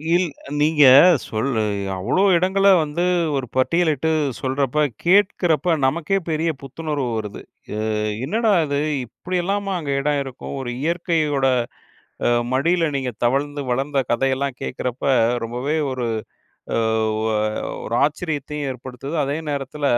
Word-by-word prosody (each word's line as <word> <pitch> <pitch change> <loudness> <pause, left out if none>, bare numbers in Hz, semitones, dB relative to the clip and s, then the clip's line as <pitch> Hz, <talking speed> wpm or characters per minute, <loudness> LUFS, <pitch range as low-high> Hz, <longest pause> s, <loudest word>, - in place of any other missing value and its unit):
இல் 180 -1 +2 0.3
நீங்க 150 -1 +4 0.4
சொல் 110 +5 -2
அ, - - 0 0.3
அவ்வளோ 185 - +1
இடங்கள 195 +3 +2 0.2
வந்து 155 +4 -2 0.3
ஒரு 130 -2 -3
பட்டியலிட்டு 160 +1 +2 0.3
சொல்றப்ப, 135 +2 0 0.2
கேட்குறப்ப 175 -4 +3
நமக்கேப் 170 +6 0
பெரிய 160 +2 0
புத்துணர்வு 145 -1 -4
வருது. 105 -2 -6 0.3
அ - - -3 0.5
என்னடா 220 +6 +1
இது 140 0 -1 0.3
இப்டியெல்லாமா 190 - -2
அங்கே 140 -3 -2
எடம் 145 0 +1
இருக்கும்! 135 +1 -8
ஒரு 120 - -5
இயற்கையோட 160 -5 0 0.8
அ - - +4 0.2
மடியில 165 +6 +2
நீங்க 130 -2 -2
தவழ்ந்து, 145 +4 0
வளந்த 135 +3 0
கதையெல்லாம் 135 +1 0
கேக்குறப்ப, 125 0 -4 0.4
ரொம்பவே 125 +7 -2 0.2
ஒரு 125 -2 -3 0.7
அ - - +1 0.4
ஒ - - -2 0.6
ஒரு 115 - -3
ஆச்சரியத்தையும் 150 -2 -3
ஏற்படுத்துது. 130 +3 -7
அதே 140 +2 -2
நேரத்தில, 145 +1 -4
145 Hz, 120 wpm, -21 LUFS, 135-170 Hz, 0.8 s, நீங்க